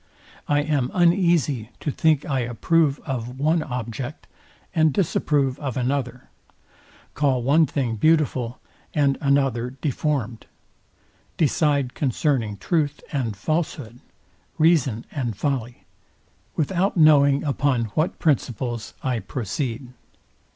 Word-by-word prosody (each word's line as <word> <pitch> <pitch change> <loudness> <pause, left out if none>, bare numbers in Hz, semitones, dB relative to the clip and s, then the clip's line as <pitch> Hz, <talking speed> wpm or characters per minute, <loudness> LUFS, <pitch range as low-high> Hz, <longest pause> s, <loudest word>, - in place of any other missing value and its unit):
I 145 0 +2
am 145 -5 0
uneasy 170 - +2
to 150 - -2
think 155 0 +2
I 135 -2 -1
approve 140 +5 +1
of 125 -2 -4
one 155 +3 +2
object, 125 +1 -5 0.5
and 160 -3 +3
disapprove 145 -6 0
of 135 -5 -4
another; 125 -1 -2 0.9
call 130 -4 +1
one 150 +5 +4
thing 125 -5 -2
beautiful, 135 -4 +1 0.4
and 140 -2 +3
another 135 -3 +1
deformed; 135 -6 -2 0.9
decide 145 -4 +1
concerning 125 -6 0
truth 145 - -1
and 120 -8 -2
falshood, 145 - -3 0.6
reason 140 -8 +2
and 120 -8 -3
folly, 125 -2 -3 0.7
without 180 +5 0
knowing 140 -3 +5
upon 140 -4 +1
what 155 +2 0
principles 120 -6 -1
I 125 -3 0
proceed. 125 +1 -4
140 Hz, 105 wpm, -23 LUFS, 125-155 Hz, 0.9 s, knowing